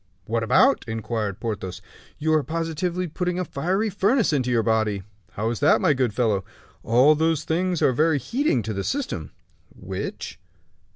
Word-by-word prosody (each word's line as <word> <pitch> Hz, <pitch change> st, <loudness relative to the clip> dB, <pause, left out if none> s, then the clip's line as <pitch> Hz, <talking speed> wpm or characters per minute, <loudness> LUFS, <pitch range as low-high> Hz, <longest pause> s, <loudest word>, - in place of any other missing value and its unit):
"What 115 Hz, +2 st, -1 dB
about?" 260 Hz, -, +4 dB
inquired 110 Hz, -2 st, -3 dB
Porthos. 105 Hz, -5 st, -4 dB, 0.4 s
"You 155 Hz, +1 st, 0 dB
are 155 Hz, -, +4 dB
positively 165 Hz, +3 st, -2 dB
putting 180 Hz, +2 st, -2 dB
a 180 Hz, -, -1 dB
fiery 185 Hz, +10 st, -1 dB
furnace 205 Hz, -, +2 dB
into 130 Hz, -3 st, 0 dB
your 120 Hz, -2 st, +2 dB
body." 110 Hz, -3 st, 0 dB, 0.3 s
"How 110 Hz, +3 st, -1 dB
is 120 Hz, -, -4 dB
that, 145 Hz, -, +4 dB
my 165 Hz, -6 st, +3 dB
good 130 Hz, -4 st, 0 dB
fellow?" 105 Hz, -3 st, 0 dB, 0.4 s
"All 125 Hz, +7 st, +5 dB
those 160 Hz, 0 st, +1 dB
things 175 Hz, +2 st, 0 dB
are 130 Hz, -, +4 dB
very 155 Hz, +3 st, +2 dB
heating 140 Hz, -, 0 dB
to 110 Hz, -, -3 dB
the 100 Hz, -1 st, -3 dB
system!" 275 Hz, -, -3 dB, 0.5 s
"Which?" -, -, -6 dB
145 Hz, 165 wpm, -24 LUFS, 115-175 Hz, 0.5 s, All